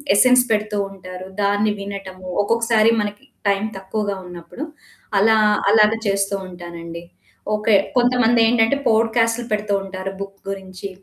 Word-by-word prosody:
Essence 250 +3 +6
పెడుతూ 210 -1 0
ఉంటారు 185 -1 -9 0.2
దాన్ని 205 +1 +2
వినటము, 195 -2 -7 0.2
ఒక్కొక్కసారి 230 0 +3
మనకి 205 +5 -5 0.2
టైం 200 0 +1
తక్కువగా 200 +1 -3
ఉన్నప్పుడు. 175 - -8 0.5
అలా 220 +2 +5 0.3
అలాగా 215 0 +5
చేస్తూ 195 0 0
ఉంటానండి. 170 -1 -9 0.5
ఓకే. 210 0 +2 0.2
కొంతమందేంటంటే 240 0 +3
పోడ్‌కాస్టులు 230 +1 +2
పెడుతూ 210 -1 -1
ఉంటారు 190 0 -6
బుక్ 195 0 -8
గురించి. 190 0 -6
205 Hz, 115 wpm, -20 LUFS, 195-225 Hz, 0.5 s, Essence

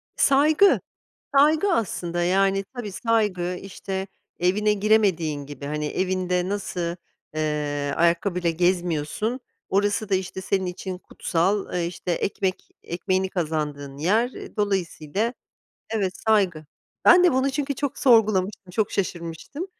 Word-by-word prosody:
Saygı. 300 +8 +5 0.6
Saygı 310 +7 +4
aslında, 175 - -1
yani, 195 +2 +2
tabii, 215 -5 -5
saygı. 200 -6 0
İşte, 195 0 -5 0.3
evine 210 +4 +2
giremediğin 190 -9 +2
gibi. 140 -1 -8
Hani 150 +1 -2
evinde 185 +1 0
nasıl, 200 -3 -3 0.6
ııı, 145 -2 -1
ayakkabıyla 170 +1 +2
gezmiyorsun, 175 - 0 0.3
orası 205 +2 +1
da, 195 - +2
işte, 190 0 -2
senin 190 0 0
için 180 +1 -5
kutsal, 190 +3 -1
e, 175 -1 0
işte, 175 0 -3
ekmek 190 +1 -2
ekmeğini 185 +2 -1
kazandığın 150 -5 -3
yer, 220 - +2
eee, - - -10
dolayısıyla, 200 - -1 0.6
evet, 200 -5 0
saygı. 190 -8 +1 0.4
Ben 355 +1 +8
de 350 - +5
bunu 260 +1 +2
çünkü 280 0 -2
çok 285 0 -3
sorgulamıştım, 210 -6 +3
çok 210 +2 0
şaşırmıştım. 180 - -4
190 Hz, 120 wpm, -24 LUFS, 170-215 Hz, 0.6 s, Ben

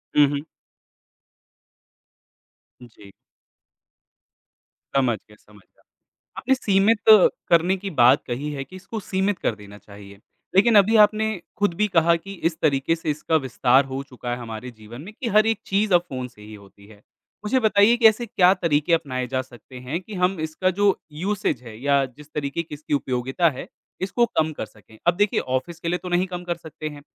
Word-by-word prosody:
हुँ, 150 - +7
हुँ। 140 0 -3 2.4
जी। 105 -4 -15 1.8
समझ 125 -5 +2
गया 105 - -21
समझ 105 -1 -20
गया। - - -33 0.5
आपने 265 +1 +1
सीमित 205 -1 +2 0.5
करने 175 +3 +3
की 195 +1 -6
बात 125 +4 +5
कही 135 +5 -4
है 140 -2 -5
कि 160 +8 -15
इसको 195 +4 -7
सीमित 190 0 -1
कर 110 - -1
देना 105 -1 -13
चाहिए, 100 -1 -14 0.4
लेकिन 220 +3 +5
अभी 205 +3 +4
आपने 215 +1 -2 0.3
खुद 205 -4 +1
भी 210 - +3
कहा 170 -2 +3
कि 195 +4 -8 0.2
इस 160 - -14
तरीके 145 +1 +1
से 165 -1 -5
इसका 155 +2 -2
विस्तार 130 +2 +3
हो 135 - -3
चुका 125 -1 -6
है 120 - -2
हमारे 115 +1 -7
जीवन 115 +2 -12
में 195 +7 -11
कि 250 - -2
हर 215 0 +6
एक 225 -2 0
चीज़ 200 0 0
अब 175 - +6
फ़ोन 130 -2 -5
से 120 -4 -19
ही 105 +1 -12
होती 100 0 -16
है, 105 -2 -17 0.4
मुझे 260 +5 +2
बताइए 220 0 +4
कि 235 - +1
ऐसे 220 +2 +1
क्या 185 -4 +4
तरीके 170 -3 0
अपनाए 130 -6 -1
जा 130 +1 -1
सकते 125 0 -14
हैं 130 +7 -4
कि 215 - -12
हम 180 0 0
इसका 160 +4 -1
जो 205 -1 +4 0.2
यूसेज़ 175 - -2
है 115 -3 -11
या 140 0 +2
जिस 140 +3 -15
तरीके 145 +2 -2
कि 155 - -12
इसकी 150 0 -6
उपयोगिता 130 +5 0
है, 130 - -8 0.3
इसको 200 +6 +1
कम 160 -8 -1
कर 145 - -5
सकें? 110 +1 -20
अब 175 - +4
देखिए 205 +2 +1
ऑफ़िस 130 +7 -3
के 170 - -6
लिए 175 - 0
तो 180 - -5
नहीं 175 +1 +1
कम 180 -1 -6
कर 175 -1 -3
सकते 160 -2 -8
हैं, 145 -1 -11
155 Hz, 190 wpm, -23 LUFS, 125-190 Hz, 2.4 s, हुँ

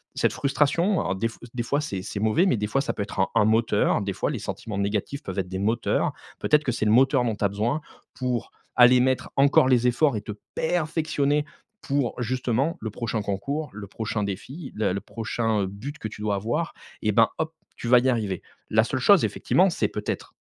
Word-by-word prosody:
cette - - +1
frustration. 155 +7 +1
Alors 90 - -1
des 110 +4 0
f - - -14 0.2
des 125 - -2
fois 140 +5 0
c’est 100 -11 -4 0.2
mauvais, 110 - +3
mais 125 - +2
des 105 - -1
fois 135 +6 +1
ça - - -2
peut 105 - -2
être 100 - -7
un 95 - +3
un 105 - +5
moteur. 110 -1 +2
Des 100 -1 -2
fois - - -1
les - - -3
sentiments 105 -3 -5
négatifs 105 +7 -2
peuvent 95 - -6
être 90 -1 -3
des 95 0 -4
moteurs. 110 +4 +1 0.3
Peut-être 150 0 +3
que 125 - +1
c’est 110 - -1
le 105 - +3
moteur 130 +2 +4
dont 115 -2 0
tu 105 - -5
as - - +3
besoin 115 +10 -1 0.3
pour 125 -2 -2 0.3
aller 125 0 +7
mettre 130 0 0
encore 135 -1 +5
les 125 -2 +3
efforts 125 +2 +3
et - - -4
te 105 - -7 0.2
perfectionner 155 -3 0 0.4
pour 140 -3 -1
justement 125 +5 0
le 110 - -3
prochain 110 0 -2
concours, 135 +10 -3
le 105 0 -7
prochain 110 +1 -3
défi, 130 - -6
la 105 -4 0
le 100 - -3
prochain 110 -2 -1
but 125 +10 -7
que 110 - -4
tu 105 - -10
dois 105 -1 0
avoir. 120 - -2 0.3
Et 105 - +2
bah, 115 +2 +4
hop, 160 0 -2 0.2
tu - - -5
vas 125 +1 +7
y 130 +2 +1
arriver. 105 -7 -1 0.3
La 110 0 +5
seule 130 +2 -2
chose 200 +7 +6
effectivement, 185 +2 +2
c’est 110 - 0
peut-être 105 0 -4
120 Hz, 215 wpm, -25 LUFS, 105-140 Hz, 0.4 s, aller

